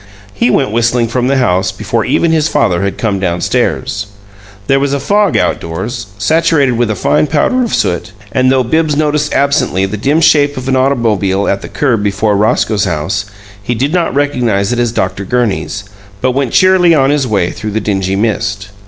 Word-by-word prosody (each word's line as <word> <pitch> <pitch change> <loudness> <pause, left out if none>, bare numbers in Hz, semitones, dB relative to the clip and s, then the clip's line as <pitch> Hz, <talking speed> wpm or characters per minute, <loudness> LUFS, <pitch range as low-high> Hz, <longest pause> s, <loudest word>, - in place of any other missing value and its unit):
He 110 +5 +1
went 130 -1 +1
whistling 120 +1 +1
from 125 +1 -1
the 135 +1 +1
house 95 -6 +1
before 110 +4 -2
even 160 +6 +1
his 160 -1 +2
father 90 - +1
had 100 0 -2
come 105 -4 -1
down 90 -2 -1
stairs. 105 +4 -1 0.6
There 135 +4 +2
was 140 0 -1
a 140 - 0
fog 205 +8 +1
outdoors, 105 +8 -3
saturated 155 +4 +2
with 120 -1 0
a 110 - -1
fine 75 - +1
powder 160 - +1
of 235 - -3
soot, 85 +3 -1 0.2
and 130 +3 +2
though 130 -1 +2
Bibbs 155 +4 0
noticed 150 -1 0
absently 140 -9 +1
the 100 +2 -4
dim 140 +9 +1
shape 145 -3 +3
of 130 0 -5
an 135 - +1
automobile 110 -7 +1
at 100 - 0
the - - -8
curb 120 -7 0
before 105 +1 0
Roscoe's 105 0 +1
house, 95 +6 -2 0.4
he 120 +5 -2
did 135 +7 -1
not 175 -6 0
recognize 125 -8 0
it 120 - -2
as 120 -2 +1
Dr. 95 -3 -2
Gurney's, 100 -5 -2 0.4
but 130 +3 +1
went 135 -2 -2
cheerily 185 -3 +4
on 135 -1 +3
his 145 -3 0
way 100 -6 0
through 105 +3 -6
the 110 +1 -1
dingy 95 -3 -1
mist. 105 -1 -2
120 Hz, 195 wpm, -13 LUFS, 100-140 Hz, 0.6 s, cheerily